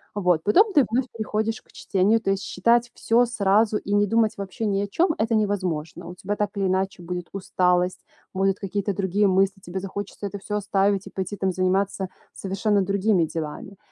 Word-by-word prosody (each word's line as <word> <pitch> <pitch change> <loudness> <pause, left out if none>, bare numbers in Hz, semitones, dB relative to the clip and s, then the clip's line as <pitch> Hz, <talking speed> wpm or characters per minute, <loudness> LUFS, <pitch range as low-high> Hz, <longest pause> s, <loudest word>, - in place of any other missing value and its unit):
Вот. 180 -5 +2
Потом 400 - +4
ты 290 - +6
вновь 245 +3 +1
приходишь 220 0 -2
к - - -26
чтению, 200 +4 +1
то 195 - 0
есть 195 0 -1
считать 235 +6 +2
всё 235 +2 +3
сразу 215 -1 +2
и 205 - -4
не 205 0 +3
думать 225 +1 +2
вообще 200 +3 -4
ни 200 -2 +1
о 200 - -2
чём- 330 - +1
это 225 +1 +1
невозможно. 185 -7 -2
У 180 - -9
тебя 200 +3 -3
так 205 -1 -1
или 195 - 0
иначе 190 0 -1
будет 180 0 -5
усталость, 180 -1 0 0.3
будут 195 0 +1
какие-то 200 +1 -2
другие 200 +2 +1
мысли, 195 +1 +2
тебе 185 +2 -5
захочется 200 +1 -6
это 200 0 -5
всё 210 +1 -4
оставить 200 -1 +1
и - - -7
пойти, 190 +1 -4
там, 190 -1 0
заниматься 190 +1 0 0.3
совершенно 200 +2 0
другими 195 -1 +2
делами. 160 +4 -6
195 Hz, 190 wpm, -24 LUFS, 185-210 Hz, 0.3 s, ты